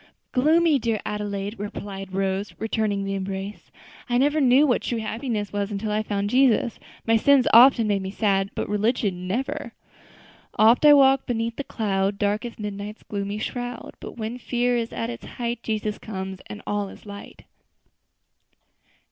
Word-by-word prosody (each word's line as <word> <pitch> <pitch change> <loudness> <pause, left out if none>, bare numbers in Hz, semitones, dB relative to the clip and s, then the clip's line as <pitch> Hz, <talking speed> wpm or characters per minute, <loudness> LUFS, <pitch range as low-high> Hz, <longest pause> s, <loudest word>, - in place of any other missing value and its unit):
"Gloomy, 310 +3 +4
dear 225 -2 -1
Adelaide!" 205 0 -4
replied 200 -2 -6
Rose, 195 +1 -2
returning 215 -2 -1
the 195 0 -3
embrace; 195 +1 -5 0.4
"I 240 - +2
never 290 +4 +2
knew 265 +2 +5
what 250 -5 +2
true 240 - -2
happiness 220 -1 -3
was 205 0 -2
until 210 +1 -3
I 210 +1 +1
found 205 -1 -2
Jesus. 250 -3 +3 0.3
My 225 0 +4
sins 275 +2 +4
often 240 0 +8
make 205 -2 +1
me 190 - -4
sad, 195 -1 +1
but - - -2
religion, 205 -4 0
never. 245 +9 -3 0.8
"'Oft 225 +6 +5
I 295 - +10
walk 270 -1 +5
beneath 230 -1 -1
the 280 - -4
cloud, 200 -5 -1
Dark 205 +2 0
as 235 - -7
midnight's 210 0 -6
gloomy 200 0 -4
shroud; 245 +2 -5
But - - -9
when 225 +2 -4
fear 245 0 0
is 230 -1 -2
at 235 +1 -4
the - - -11
height, 235 -1 -4
Jesus 215 -2 -2
comes, 190 -2 -6
and 205 - -9
all 205 -1 -2
is - - -14
light.'" 200 -1 -10
215 Hz, 165 wpm, -24 LUFS, 200-245 Hz, 0.8 s, I